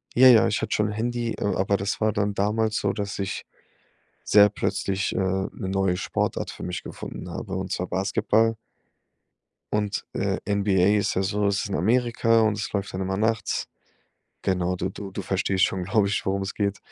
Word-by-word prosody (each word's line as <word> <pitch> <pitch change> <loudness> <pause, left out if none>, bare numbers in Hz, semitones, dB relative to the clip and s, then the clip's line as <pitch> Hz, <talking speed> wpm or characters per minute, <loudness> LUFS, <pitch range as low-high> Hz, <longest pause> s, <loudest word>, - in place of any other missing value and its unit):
Ja, 130 +2 +8
ja, 120 -3 +7
ich 105 0 0
hatte - - -2
schon 105 0 +1
Handy, 120 +2 -2
a 100 -2 0
aber 95 +2 +1
das 100 +1 -2
war 110 -1 +2
dann 100 0 0
damals 110 +2 +1
so, 100 -1 0
dass 100 -1 -4
ich 100 -1 -4 0.8
sehr 105 0 +6
plötzlich, 95 -1 -1
äh, - - -4
'ne 95 0 0
neue 95 -1 0
Sportart - - -2
für - - -11
mich 90 0 -4
gefunden - - -8
habe, 95 +3 -5
und 95 0 -4
zwar 90 -1 -2
Basketball. 110 +4 +1 1.2
Und, 105 -1 -1
äh, - - 0
NBA 100 0 +3
ist 100 +1 -1
ja 95 - +1
so 100 +2 0
es 100 +1 +1
ist 110 - -5
in 100 - -2
Amerika 115 +2 +2
und 110 -1 +3
es 105 - -3
läuft 100 -1 -2
dann 95 - -3
immer 95 0 -1
nachts. 110 +1 0 0.7
Genau, 90 -1 0
du 90 - -1
du 95 0 -8
du 100 - -4
verstehst 95 0 +1
schon, 95 -1 -3
glaube 100 +2 +2
ich, 100 - -1
worum 95 0 0
es 95 - -4
geht. 100 -1 -1
100 Hz, 195 wpm, -25 LUFS, 95-105 Hz, 1.2 s, Ja